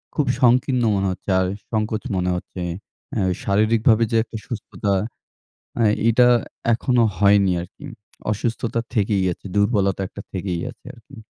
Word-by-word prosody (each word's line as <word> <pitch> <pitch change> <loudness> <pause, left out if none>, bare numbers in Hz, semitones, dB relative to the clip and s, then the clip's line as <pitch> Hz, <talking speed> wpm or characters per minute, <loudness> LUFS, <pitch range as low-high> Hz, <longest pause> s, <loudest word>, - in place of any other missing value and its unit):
খুব 150 - +1 0.2
সংকীর্ণ 125 0 +3
মনে 100 0 0
হচ্ছে। 95 +2 -8
আর 95 - +1 0.2
সংকোচ 110 0 -1
মনে 90 0 0
হচ্ছে। 90 +1 -6 0.5
এ্যা 105 - +1 0.2
শারীরিকভাবে 110 +2 +3
যে 115 - +1
একটা 115 -1 -8
সুস্থতা। 105 -3 -3 0.9
এ - - +4 0.2
এটা 120 +2 +5 0.5
এখনো 120 +1 +2
হয়নি 100 -1 +4
আরকি। 95 +11 -11 0.5
অসুস্থতা 115 +2 -2
থেকেই 100 -3 +1
আছে, - - -23
দুর্বলতা 100 -2 +2
একটা 100 - -9
থেকেই 90 -2 -3
আছে - - -22
আরকি। 125 +3 -16
105 Hz, 140 wpm, -22 LUFS, 100-115 Hz, 0.9 s, এটা